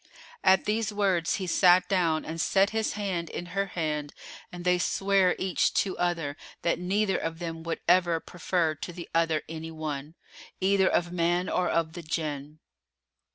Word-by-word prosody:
At 190 Hz, -, +5 dB
these 215 Hz, 0 st, 0 dB
words 190 Hz, -5 st, +1 dB
he 190 Hz, -, -3 dB
sat 180 Hz, +1 st, +5 dB
down 170 Hz, -5 st, +1 dB
and 160 Hz, +1 st, -3 dB
set 195 Hz, +1 st, +3 dB
his 220 Hz, 0 st, -1 dB
hand 185 Hz, -5 st, -3 dB
in 175 Hz, -, -5 dB
her 195 Hz, +1 st, 0 dB
hand 150 Hz, -5 st, -3 dB, 0.4 s
and 175 Hz, 0 st, -8 dB
they 180 Hz, 0 st, +3 dB
sware 195 Hz, +2 st, +2 dB
each 190 Hz, -2 st, 0 dB
to 190 Hz, -, +1 dB
other 165 Hz, -5 st, -1 dB, 0.3 s
that 170 Hz, -, +1 dB
neither 195 Hz, +2 st, +1 dB
of 165 Hz, 0 st, -4 dB
them 165 Hz, -1 st, -5 dB
would 165 Hz, 0 st, -4 dB
ever 175 Hz, -1 st, +4 dB
prefer 170 Hz, -1 st, -1 dB
to 155 Hz, +4 st, -7 dB
the 175 Hz, -1 st, -8 dB
other 165 Hz, -2 st, +2 dB
any 160 Hz, 0 st, -6 dB
one, 155 Hz, -1 st, -5 dB, 0.4 s
either 190 Hz, 0 st, +3 dB
of 175 Hz, -1 st, +1 dB
man 175 Hz, +1 st, +1 dB
or 180 Hz, -, 0 dB
of 165 Hz, -1 st, 0 dB
the 175 Hz, -, -7 dB
Jann. 150 Hz, -2 st, -4 dB
175 Hz, 170 wpm, -28 LUFS, 160-190 Hz, 0.4 s, At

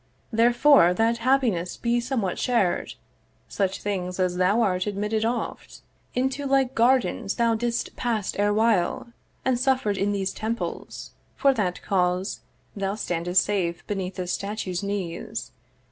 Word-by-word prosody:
'Therefore, 235 Hz, -4 st, +5 dB
that 230 Hz, +2 st, +2 dB
happiness 230 Hz, -8 st, +1 dB
be 240 Hz, 0 st, +1 dB
somewhat 235 Hz, -7 st, -2 dB
shar'd, 230 Hz, -8 st, 0 dB, 0.5 s
'Such 195 Hz, -1 st, -2 dB
things 185 Hz, -3 st, -3 dB
as 180 Hz, -1 st, +1 dB
thou 190 Hz, +6 st, +3 dB
art 185 Hz, -2 st, 0 dB
are -, -, +2 dB
admitted 210 Hz, +2 st, -1 dB
oft 235 Hz, +2 st, -4 dB, 0.3 s
'Into 265 Hz, +3 st, -1 dB
like 270 Hz, -1 st, +2 dB
gardens 235 Hz, -5 st, +2 dB
thou 235 Hz, -1 st, +2 dB
didst 235 Hz, +1 st, -2 dB
pass 225 Hz, -5 st, -1 dB
erewhile, 205 Hz, 0 st, +1 dB, 0.4 s
'And 255 Hz, -2 st, +2 dB
suffer'd 255 Hz, -6 st, +1 dB
in 200 Hz, +1 st, +1 dB
these 195 Hz, -1 st, -1 dB
temples: 225 Hz, +2 st, -5 dB, 0.2 s
for 275 Hz, -1 st, +4 dB
that 190 Hz, -7 st, -2 dB
cause 180 Hz, 0 st, 0 dB, 0.4 s
'Thou 200 Hz, 0 st, -2 dB
standest 175 Hz, -2 st, +1 dB
safe 180 Hz, -5 st, -2 dB
beneath 190 Hz, -2 st, -3 dB
this 180 Hz, -1 st, -3 dB
statue's 200 Hz, -3 st, -3 dB
knees.' 200 Hz, -4 st, -4 dB
205 Hz, 135 wpm, -25 LUFS, 185-235 Hz, 0.5 s, Therefore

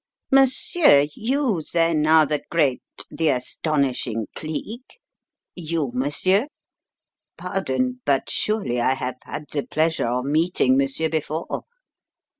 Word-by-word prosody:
"Monsieur, 270 Hz, -, +4 dB
you 245 Hz, -, 0 dB
then 165 Hz, -2 st, +2 dB
are 160 Hz, 0 st, +6 dB
the 150 Hz, 0 st, -2 dB
great, 145 Hz, -7 st, +1 dB, 0.3 s
the 160 Hz, -1 st, 0 dB
astonishing 130 Hz, -3 st, -1 dB
Cleek? 220 Hz, -, -7 dB, 0.5 s
You, 160 Hz, -6 st, -3 dB
monsieur? 185 Hz, -, +1 dB, 0.9 s
Pardon, 255 Hz, 0 st, -2 dB
but 140 Hz, -1 st, +1 dB
surely 205 Hz, -, 0 dB
I 130 Hz, +2 st, +2 dB
have 125 Hz, -1 st, -4 dB
had 150 Hz, -, -6 dB
the 145 Hz, -, -1 dB
pleasure 160 Hz, -1 st, 0 dB
of 125 Hz, +2 st, -1 dB
meeting 155 Hz, -2 st, +2 dB
monsieur 140 Hz, +4 st, +1 dB
before? 160 Hz, 0 st, -3 dB
155 Hz, 110 wpm, -23 LUFS, 135-185 Hz, 0.9 s, are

